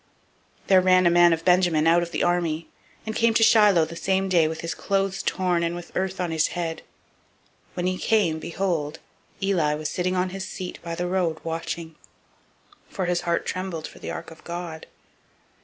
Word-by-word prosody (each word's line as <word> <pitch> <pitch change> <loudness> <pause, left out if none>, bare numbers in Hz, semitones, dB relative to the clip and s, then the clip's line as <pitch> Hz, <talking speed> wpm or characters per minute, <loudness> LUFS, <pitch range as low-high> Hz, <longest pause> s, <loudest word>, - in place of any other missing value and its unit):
004:012 - - -30
There 190 -1 +6
ran 185 0 +4
a 170 - +5
man 175 0 +6
of 165 0 -1
Benjamin 175 -4 +3
out 170 +1 +5
of 170 - -3
the - - -2
army, 170 -2 0 0.4
and 220 0 -4
came 230 -1 +2
to 225 - +5
Shiloh 210 -7 +5
the 170 - -9
same 190 +2 0
day, 170 -4 +4
with 160 0 -5
his 165 0 -3
clothes 195 -1 -1
torn, 180 -2 0
and 170 0 -1
with 175 0 -9
earth 190 0 -2
on 180 -2 -1
his 160 -1 +2
head. 165 -2 -2 1.0
004:013 - - -29
When 175 - -2
he 185 0 0
came, 200 -8 +2
behold, 165 -3 -2 0.5
Eli 170 -7 +1
was 155 0 -4
sitting 185 +1 -1
on 185 0 0
his 190 +1 -6
seat 185 -2 -6
by 170 -1 -5
the 175 - -2
road 175 -3 0
watching; 165 0 -4 1.0
for 185 - -3
his 175 0 0
heart 170 -1 -1
trembled 185 -4 -4
for - - -11
the - - -7
ark - - -6
of 165 - -15
God. 170 -2 -6
175 Hz, 200 wpm, -24 LUFS, 165-185 Hz, 1.0 s, There